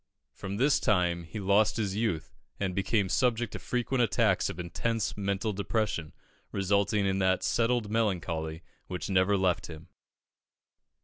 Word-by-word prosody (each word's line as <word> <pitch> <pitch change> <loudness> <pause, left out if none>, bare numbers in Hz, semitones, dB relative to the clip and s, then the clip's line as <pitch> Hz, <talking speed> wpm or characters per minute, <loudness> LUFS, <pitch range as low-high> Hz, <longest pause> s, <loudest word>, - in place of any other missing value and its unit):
From 100 0 -5
this 135 +5 +3
time 90 -5 +1
he 105 +7 -7
lost 100 +3 +3
his 100 -3 -1
youth, 105 -8 -1 0.3
and 95 -2 -1
became 100 +1 +1
subject 120 +1 +1
to - - -5
frequent 125 +1 -1
attacks 110 - +2
of - - -7
intense 110 +5 -2
mental 100 +1 -1
depression, 100 -5 -1 0.4
resulting 100 +1 +1
in 95 0 +1
that 95 -1 +2
settled 115 +1 +1
melancholy 85 -7 -1 0.2
which 90 +1 -4
never 95 +2 +3
left 90 -2 +1
him. 80 -1 -11
100 Hz, 140 wpm, -29 LUFS, 90-110 Hz, 0.4 s, this